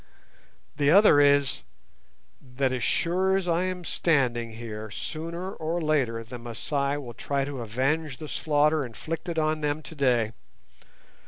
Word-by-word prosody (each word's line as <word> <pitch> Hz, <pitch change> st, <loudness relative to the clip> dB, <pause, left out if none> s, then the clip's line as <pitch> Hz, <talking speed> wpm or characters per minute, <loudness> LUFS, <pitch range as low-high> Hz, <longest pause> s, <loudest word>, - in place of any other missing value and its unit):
The 145 Hz, -1 st, +3 dB
other 195 Hz, -3 st, +7 dB
is, 140 Hz, -1 st, +3 dB, 0.8 s
that 130 Hz, 0 st, -1 dB
as 125 Hz, -3 st, -2 dB
sure 185 Hz, +3 st, +2 dB
as 190 Hz, -2 st, -3 dB
I 170 Hz, +1 st, +2 dB
am 185 Hz, -1 st, -3 dB
standing 125 Hz, -9 st, +1 dB
here, 110 Hz, -1 st, -7 dB
sooner 170 Hz, -, -5 dB
or 165 Hz, +2 st, -2 dB
later 135 Hz, -8 st, 0 dB
the 120 Hz, +2 st, -9 dB
Masai 140 Hz, +5 st, -2 dB
will 125 Hz, -5 st, -7 dB
try 140 Hz, +3 st, -2 dB
to 140 Hz, -3 st, -5 dB
avenge 135 Hz, +6 st, -1 dB
the 155 Hz, -, -7 dB
slaughter 150 Hz, 0 st, +2 dB
inflicted 165 Hz, +7 st, -5 dB
on 155 Hz, 0 st, +1 dB
them 150 Hz, +1 st, -1 dB
today. 125 Hz, -8 st, +1 dB
145 Hz, 140 wpm, -27 LUFS, 125-160 Hz, 0.8 s, other